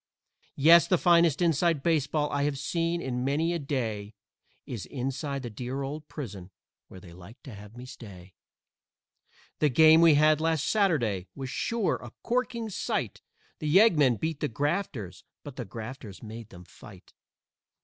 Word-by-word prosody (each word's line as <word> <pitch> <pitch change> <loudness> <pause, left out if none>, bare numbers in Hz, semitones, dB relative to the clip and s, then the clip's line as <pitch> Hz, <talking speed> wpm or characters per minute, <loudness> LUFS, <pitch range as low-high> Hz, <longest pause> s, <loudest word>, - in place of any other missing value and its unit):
Yes, 165 +4 +6
the 180 - +3
finest 170 -2 +3
"inside" 165 -2 +1
baseball 150 -2 +1
I 140 - -1
have 145 -1 -1
seen 170 +4 -2
in 125 -1 -3
many 155 +6 0
a 170 - -2
day 115 -8 -4 0.5
Is 115 -6 -6
inside 135 +1 -4
the 120 - -6
dear 125 +5 -5
old 150 +3 -6
prison, 100 - -8 0.4
where 95 - -12
they 90 -2 -14
like 95 +8 -14
to 130 - -10
have 105 +3 -12
me 125 - -9
stay. 95 -7 -12 1.3
The 150 - +3
game 160 +4 +6
we 165 -3 +6
had 155 +1 +4
last 160 -3 0
Saturday 125 - +1
was 135 -1 -6
sure 230 -4 -1
a - - -10
corking 240 -1 -1
sight; - - -3 0.4
The 155 - -4
Yeggmen 155 - +5
beat 160 -2 -3
the 150 - -1
Grafters, 145 - -3 0.2
but 145 -3 -9
the 125 - -5
Grafters 115 -3 -9
made 110 0 -9
them 90 -3 -13
fight. - - -16
140 Hz, 160 wpm, -28 LUFS, 115-165 Hz, 1.3 s, Yes